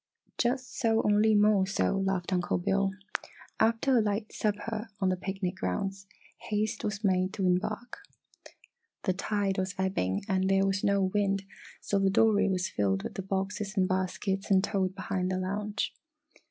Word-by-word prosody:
"Just 255 Hz, +1 st, -1 dB
so, 225 Hz, -2 st, +2 dB
only 210 Hz, +1 st, +4 dB
more 205 Hz, -2 st, +4 dB
so!" 195 Hz, 0 st, +1 dB
laughed 195 Hz, -1 st, -1 dB
Uncle 180 Hz, -1 st, +1 dB
Bill. 195 Hz, +2 st, +1 dB, 0.7 s
After 230 Hz, +4 st, +3 dB
a 235 Hz, -, +5 dB
light 210 Hz, 0 st, -2 dB
supper 215 Hz, +1 st, -2 dB
on 190 Hz, -2 st, +2 dB
the 185 Hz, -, +2 dB
picnic 190 Hz, 0 st, -3 dB
grounds, 195 Hz, -, -3 dB, 0.4 s
haste 210 Hz, 0 st, -1 dB
was 210 Hz, +1 st, -3 dB
made 185 Hz, -1 st, +2 dB
to 195 Hz, -3 st, -1 dB
embark. 195 Hz, -, -1 dB, 1.0 s
The 185 Hz, -, +1 dB
tide 195 Hz, 0 st, -1 dB
was 190 Hz, +1 st, -2 dB
ebbing 185 Hz, -, 0 dB
and 190 Hz, 0 st, +1 dB
there 195 Hz, 0 st, +4 dB
was 195 Hz, 0 st, 0 dB
no 200 Hz, -1 st, +3 dB
wind 195 Hz, 0 st, +1 dB, 0.4 s
so 200 Hz, -, 0 dB
the 195 Hz, 0 st, +3 dB
dory 205 Hz, +1 st, +4 dB
was 185 Hz, -1 st, 0 dB
filled 95 Hz, -, 0 dB
with -, -, -5 dB
the -, -, -4 dB
boxes 195 Hz, +2 st, -3 dB
and 185 Hz, -1 st, +3 dB
baskets 190 Hz, +1 st, -1 dB
and 190 Hz, -1 st, +4 dB
towed 190 Hz, -3 st, 0 dB
behind 185 Hz, -1 st, -2 dB
the 185 Hz, -, 0 dB
launch. 205 Hz, +3 st, -2 dB
195 Hz, 165 wpm, -29 LUFS, 185-210 Hz, 1.0 s, a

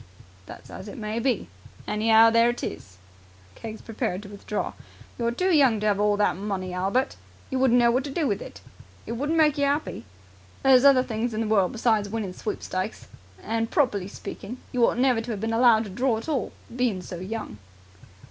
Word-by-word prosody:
"That's -, -, -11 dB
as 190 Hz, -, -9 dB
it 205 Hz, -, -8 dB
may 215 Hz, +1 st, -3 dB
be. 245 Hz, -2 st, 0 dB, 0.4 s
Anyhow, 225 Hz, +1 st, +5 dB
there 230 Hz, +1 st, +5 dB
it 240 Hz, -, -4 dB
is." 95 Hz, -1 st, -6 dB, 0.6 s
Keggs 220 Hz, -, -8 dB
prepared 220 Hz, -4 st, -3 dB
to 200 Hz, -, -10 dB
withdraw. 205 Hz, +1 st, -4 dB, 0.5 s
"You're 235 Hz, 0 st, +1 dB
too 365 Hz, +11 st, 0 dB
young 270 Hz, -9 st, +4 dB
to 210 Hz, -, -3 dB
'ave 205 Hz, -1 st, +2 dB
all 205 Hz, 0 st, +2 dB
that 210 Hz, -, +2 dB
money, 190 Hz, -1 st, -4 dB
Albert. 195 Hz, +9 st, 0 dB, 0.3 s
You 260 Hz, -, 0 dB
wouldn't 255 Hz, -2 st, +4 dB
know 235 Hz, 0 st, +5 dB
what 255 Hz, +3 st, +1 dB
to -, -, -4 dB
do 305 Hz, +3 st, -1 dB
with 205 Hz, -7 st, -1 dB
it. -, -, -10 dB, 0.4 s
It -, -, -6 dB
wouldn't 290 Hz, +7 st, -1 dB
make 300 Hz, -2 st, +3 dB
you 285 Hz, -, +3 dB
'appy. 280 Hz, -, -2 dB, 0.6 s
There's 265 Hz, 0 st, +6 dB
other 270 Hz, -2 st, +7 dB
things 230 Hz, -1 st, -3 dB
in 220 Hz, -, -1 dB
the 225 Hz, -, -1 dB
world 200 Hz, -4 st, +2 dB
besides 220 Hz, -3 st, +1 dB
winning 210 Hz, -4 st, -3 dB
sweepstakes. 185 Hz, 0 st, -4 dB, 0.3 s
And, 225 Hz, +1 st, -1 dB
properly 205 Hz, -10 st, +1 dB
speaking, 200 Hz, +3 st, -8 dB
you 245 Hz, -2 st, +3 dB
ought -, -, -1 dB
never 250 Hz, -2 st, +3 dB
to 235 Hz, -, -8 dB
have 215 Hz, -3 st, -3 dB
been 225 Hz, +2 st, -2 dB
allowed 230 Hz, -1 st, +5 dB
to 205 Hz, -, -8 dB
draw 245 Hz, +3 st, +1 dB
at 225 Hz, -, -8 dB
all, 290 Hz, -6 st, -1 dB, 0.2 s
being 235 Hz, -7 st, 0 dB
so 175 Hz, -, -7 dB
young." 185 Hz, -, -6 dB
225 Hz, 200 wpm, -25 LUFS, 205-250 Hz, 0.6 s, other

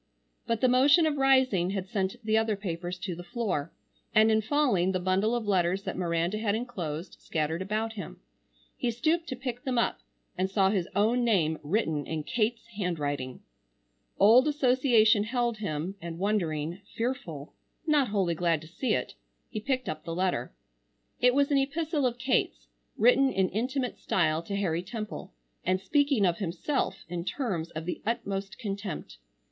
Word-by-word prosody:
But 230 Hz, -1 st, 0 dB
the 255 Hz, -, +5 dB
motion 280 Hz, +7 st, +5 dB
of 305 Hz, -2 st, 0 dB
rising 260 Hz, -9 st, +3 dB
had 190 Hz, 0 st, -4 dB
sent 190 Hz, 0 st, -1 dB
the 220 Hz, 0 st, +2 dB
other 220 Hz, -1 st, +2 dB
papers 180 Hz, -2 st, -4 dB
to 180 Hz, 0 st, -4 dB
the 175 Hz, -, -8 dB
floor, 175 Hz, -6 st, -2 dB, 0.4 s
and 220 Hz, +1 st, +6 dB
in 220 Hz, 0 st, +3 dB
falling 220 Hz, -7 st, +2 dB
the 185 Hz, -, 0 dB
bundle 190 Hz, +5 st, +1 dB
of 235 Hz, -2 st, -2 dB
letters 190 Hz, -1 st, +1 dB
that 190 Hz, -, -4 dB
Miranda 170 Hz, +3 st, 0 dB
had 210 Hz, -2 st, +1 dB
enclosed, 180 Hz, -8 st, -5 dB
scattered 160 Hz, +2 st, -2 dB
about 215 Hz, +3 st, -2 dB
him. 200 Hz, -6 st, -8 dB, 0.6 s
He 245 Hz, -, -1 dB
stooped 315 Hz, +9 st, 0 dB
to 260 Hz, -, -3 dB
pick 250 Hz, -1 st, -5 dB
them 255 Hz, -2 st, -1 dB
up 235 Hz, -, +1 dB, 0.4 s
and 185 Hz, +1 st, 0 dB
saw 195 Hz, -1 st, +3 dB
his 190 Hz, -5 st, 0 dB
own 225 Hz, +4 st, +3 dB
name 165 Hz, -9 st, +2 dB
written 155 Hz, -3 st, -1 dB
in 160 Hz, -1 st, -3 dB
Kate's 230 Hz, +6 st, -1 dB
handwriting. 145 Hz, -8 st, -2 dB, 0.8 s
Old 230 Hz, +7 st, +6 dB
association 250 Hz, -7 st, +4 dB
held 240 Hz, 0 st, 0 dB
him, 180 Hz, -3 st, -3 dB
and 170 Hz, -1 st, -6 dB
wondering, 175 Hz, -4 st, -1 dB
fearful, 225 Hz, -, -4 dB, 0.3 s
not 300 Hz, -4 st, +3 dB
wholly 195 Hz, -4 st, +1 dB
glad 165 Hz, -1 st, +1 dB
to 155 Hz, -, -11 dB
see 215 Hz, -, -1 dB
it, 125 Hz, -, -3 dB, 0.4 s
he -, -, -3 dB
picked 255 Hz, +3 st, -1 dB
up -, -, -4 dB
the 165 Hz, -1 st, -4 dB
letter. 185 Hz, 0 st, -1 dB, 0.7 s
It 250 Hz, +1 st, +4 dB
was 285 Hz, +1 st, +3 dB
an 280 Hz, -, +4 dB
epistle 295 Hz, 0 st, 0 dB
of 240 Hz, -1 st, -3 dB
Kate's, 240 Hz, -, 0 dB, 0.3 s
written 260 Hz, +4 st, +5 dB
in 190 Hz, -1 st, +1 dB
intimate 250 Hz, +3 st, -2 dB
style 160 Hz, -3 st, +1 dB
to 200 Hz, +4 st, -5 dB
Harry 175 Hz, -4 st, 0 dB
Temple 215 Hz, -, -6 dB, 0.3 s
and 185 Hz, +1 st, +1 dB
speaking 280 Hz, +2 st, +2 dB
of 175 Hz, -2 st, +1 dB
himself 195 Hz, -, -2 dB
in 170 Hz, 0 st, -4 dB
terms 185 Hz, -, -2 dB
of 160 Hz, -1 st, -6 dB
the 180 Hz, -, -4 dB
utmost 200 Hz, -4 st, -3 dB
contempt. 195 Hz, -, -5 dB
205 Hz, 170 wpm, -28 LUFS, 175-245 Hz, 0.8 s, and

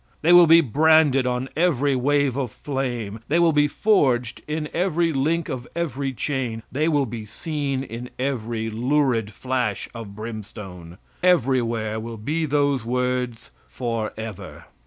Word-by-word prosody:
They 170 Hz, +3 st, +5 dB
will 175 Hz, -1 st, +9 dB
be 165 Hz, +1 st, +8 dB
branded 150 Hz, -1 st, +4 dB
on 125 Hz, +1 st, -1 dB
every 145 Hz, -5 st, +2 dB
wave 140 Hz, 0 st, +1 dB
of 135 Hz, -3 st, -2 dB
flame, 120 Hz, -5 st, -4 dB
they 155 Hz, -, +2 dB
will 170 Hz, -1 st, +4 dB
be 145 Hz, 0 st, +4 dB
forged 130 Hz, -, +1 dB
in 150 Hz, 0 st, -2 dB
every 170 Hz, -2 st, +1 dB
link 160 Hz, +5 st, 0 dB
of 120 Hz, -2 st, -5 dB
every 140 Hz, -5 st, -2 dB
chain, 125 Hz, -2 st, -3 dB
they 150 Hz, +5 st, 0 dB
will 145 Hz, -4 st, +2 dB
be 115 Hz, -2 st, -6 dB
seen 140 Hz, +3 st, -3 dB
in 125 Hz, -1 st, -7 dB
every 115 Hz, -4 st, -2 dB
lurid 125 Hz, -2 st, +1 dB
flash 125 Hz, -3 st, -2 dB
of 110 Hz, -4 st, -8 dB
brimstone 100 Hz, -5 st, -8 dB, 0.2 s
everywhere 120 Hz, -10 st, +2 dB
will 115 Hz, +1 st, -6 dB
be 155 Hz, +9 st, -2 dB
those 145 Hz, -3 st, +1 dB
words 125 Hz, -1 st, -2 dB, 0.2 s
"for 115 Hz, -3 st, -3 dB
ever." 105 Hz, -4 st, -8 dB
130 Hz, 145 wpm, -23 LUFS, 115-150 Hz, 0.2 s, will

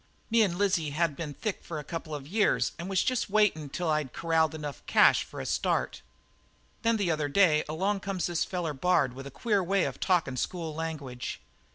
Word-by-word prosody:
"Me 230 Hz, 0 st, +5 dB
and 185 Hz, -5 st, +2 dB
Lizzie 180 Hz, -6 st, +1 dB
had 155 Hz, +1 st, 0 dB
been 150 Hz, -2 st, -5 dB
thick 215 Hz, -4 st, -4 dB
for 165 Hz, -, -6 dB
a 150 Hz, -, -5 dB
couple 155 Hz, 0 st, -5 dB
of 140 Hz, -2 st, -7 dB
years 165 Hz, -, +2 dB
and 175 Hz, +3 st, -5 dB
was 190 Hz, -3 st, +2 dB
jest 255 Hz, -4 st, 0 dB
waitin' 195 Hz, -8 st, +2 dB
till 175 Hz, +5 st, -3 dB
I'd 150 Hz, -4 st, 0 dB
corralled 160 Hz, -1 st, +1 dB
enough 150 Hz, -2 st, -6 dB
cash -, -, +5 dB
for -, -, -10 dB
a -, -, -4 dB
start. -, -, 0 dB, 0.8 s
Then 230 Hz, 0 st, +2 dB
the 195 Hz, -5 st, +1 dB
other 155 Hz, -2 st, 0 dB
day 155 Hz, -2 st, +4 dB
along 195 Hz, +6 st, 0 dB
comes 190 Hz, -3 st, -2 dB
this 175 Hz, -2 st, 0 dB
feller 175 Hz, -4 st, -3 dB
Bard 145 Hz, -3 st, +2 dB
with 135 Hz, +2 st, -8 dB
a -, -, -6 dB
queer 205 Hz, -, 0 dB
way 195 Hz, +1 st, +2 dB
of -, -, -3 dB
talkin' 165 Hz, -9 st, +1 dB
school 165 Hz, +3 st, -3 dB
language. 150 Hz, -6 st, -5 dB
165 Hz, 205 wpm, -29 LUFS, 150-190 Hz, 0.8 s, Me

